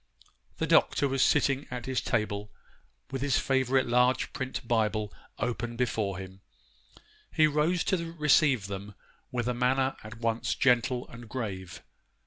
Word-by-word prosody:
] - - -39
The - - 0
Doctor 140 - +3
was 135 -1 0
sitting 135 +2 +2
at 125 -1 -5
his 130 -1 -1
table 105 -3 -1 0.6
with 135 -1 -3
his 140 -1 +2
favourite 130 -1 +2
large 125 +2 +2
print 130 -1 -4
Bible 110 -2 0 0.2
open 120 -1 -3
before 110 -5 -1
him. 95 0 -9 0.9
He 155 - +4
rose 155 +4 +1
to 170 -3 -1
receive 145 - +3
them 100 0 -7 0.4
with 120 -1 -2
a 125 - +1
manner 130 +2 +1
at 110 +1 -9
once 115 0 -1
gentle 125 -1 +2
and 115 -2 -11
grave. 100 -7 -5
125 Hz, 145 wpm, -29 LUFS, 110-135 Hz, 0.9 s, He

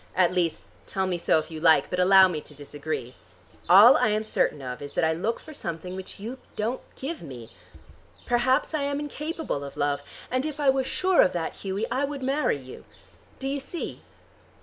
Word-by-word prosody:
At 180 -1 +3
least, 175 -3 0 0.2
tell 190 -1 -1
me 180 -2 -1
so 165 - +3
if 155 - -3
you 160 - -6
like, 160 -4 +4
but 180 - -1
allow 190 +1 +7
me 160 -4 -3
to 150 - -16
disagree. 145 -3 -5 0.6
All 210 +8 +9
I - - +3
am 215 0 +1
certain 185 -8 0
of 125 -1 -6
is 145 0 -8
that - - 0
I 160 0 +3
look 205 +8 -2
for 310 - -12
something 180 - -5
which 190 +1 -8
you 235 +6 -6 0.2
don't 230 +4 -2
give 310 +5 -5
me. 120 -7 -10 0.7
Perhaps 255 +5 +2
I 305 - 0
am 280 0 -1
incapable 300 - -4
of 140 - -9
love. 145 0 0 0.3
And 255 +1 +1
if 305 0 -4
I 280 -2 +4
was 265 -1 -1
sure 370 +3 +3
of - - +3
that, 170 -2 -3
Hughie, 195 +2 -3
I 265 +3 +1
would 280 -1 -6
marry 275 - +1
you. 130 -2 -11 0.5
Do 270 - -4
you 280 +1 -1
see?" 305 +5 -6
190 Hz, 205 wpm, -26 LUFS, -, 0.7 s, All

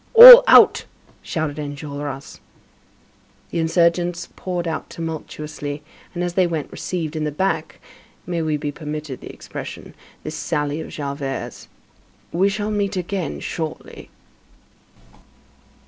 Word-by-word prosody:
"All - - +13
out!" - - +6 0.4
shouted 155 -2 -3
Enjolras. 145 -1 -7 1.1
The 170 - -2
insurgents 170 +1 +1
poured 175 -2 -4
out 160 - -4
tumultuously, 150 -2 -6 0.3
and, 175 - -2
as 175 -1 -2
they 185 0 +2
went, 160 -4 -4
received 165 -4 -4
in 155 - -2
the 150 - -2
back,—may 165 0 -5
we 155 -1 -1
be 145 0 -4
permitted 150 -2 -7
the - - -9
expression,—this - - -10
sally 145 +1 -2
of - - -8
Javert's: 140 -2 -5 0.6
"We 190 +4 +2
shall 205 +1 -3
meet 200 -2 -1
again 180 0 -4
shortly!" 160 -2 -6
160 Hz, 115 wpm, -21 LUFS, 150-175 Hz, 1.1 s, All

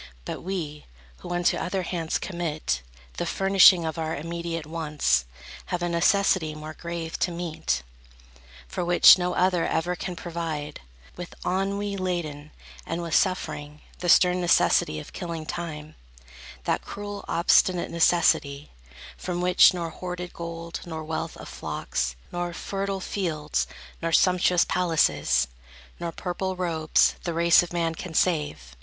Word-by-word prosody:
But - - -5
we, 165 -5 -5 0.3
who - - -10
unto 175 0 +1
other 185 +1 -2
hands 165 -2 -2
commit 155 - -3 0.4
The - - -1
furnishing 195 -3 +6
of 160 +1 -3
our 160 0 -2
immediate 165 +1 -4
wants, 155 - 0 0.4
Have 175 -1 -2
a 175 - 0
necessity 170 -2 +2
more 155 +1 -7
grave 170 -1 -5
to - - +1
meet, 165 - -2 0.8
For - - -3
which 175 +1 +8
no 180 0 -1
other 180 -2 +2
ever 175 +2 0
can 180 0 -5
provide, 165 -4 -5 0.4
With 175 - -8
ennui 200 +2 -1
laden, 165 -6 -3 0.3
and 170 +1 -4
with 165 -2 -4
suffering; 150 -5 0 0.2
The 175 - -2
stern 180 +1 +5
necessity 170 - +3
of 75 - -11
killing 165 -3 -5
time; 155 -2 -6 0.7
That - - 0
cruel, 205 0 -7
obstinate 175 +1 +3
necessity, 160 -4 +2 0.5
From 175 -1 -3
which, 180 0 +6
nor 170 -2 -4
hoarded 180 0 -6
gold, 170 0 -6
nor 160 -2 -6
wealth 160 0 -4
of - - -10
flocks, - - -3 0.2
Nor 175 0 -3
fertile 195 +2 -3
fields, 160 -7 -2 0.3
nor 165 0 -1
sumptuous 180 0 +4
palaces, 150 - +2 0.5
Nor 170 -1 -3
purple 185 +2 -3
robes, 165 -4 +2
the 170 -2 -3
race 170 0 +6
of 175 - -6
man 165 -1 0
can 165 0 -8
save. 75 - 0
170 Hz, 140 wpm, -26 LUFS, 160-180 Hz, 0.8 s, which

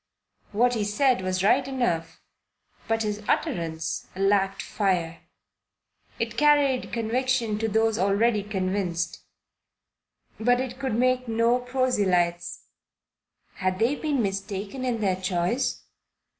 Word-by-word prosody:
What 245 +4 +3
he 220 -3 0
said 240 +3 +2
was 185 0 -1
right 260 +6 +3
enough, 240 -12 -2 0.6
but 225 0 +1
his 210 0 -3
utterance 160 -2 -1
lacked 195 0 +1
fire. 180 -5 -1 1.0
It - - -3
carried 290 -3 +3
conviction 235 -1 0
to 225 - 0
those 220 +1 +1
already 205 +3 +2
convinced; 185 -4 -2 1.2
but 245 +2 +3
it 255 0 -4
could 265 -5 -1
make 255 +1 +2
no 230 +2 +2
proselytes. 195 -9 0 0.9
Had 185 -1 -1
they 230 +7 +2
been 290 -4 -1
mistaken 195 +4 -4
in 235 -3 -1
their 190 -3 +1
choice? 185 +6 -1
215 Hz, 115 wpm, -26 LUFS, 190-250 Hz, 1.2 s, What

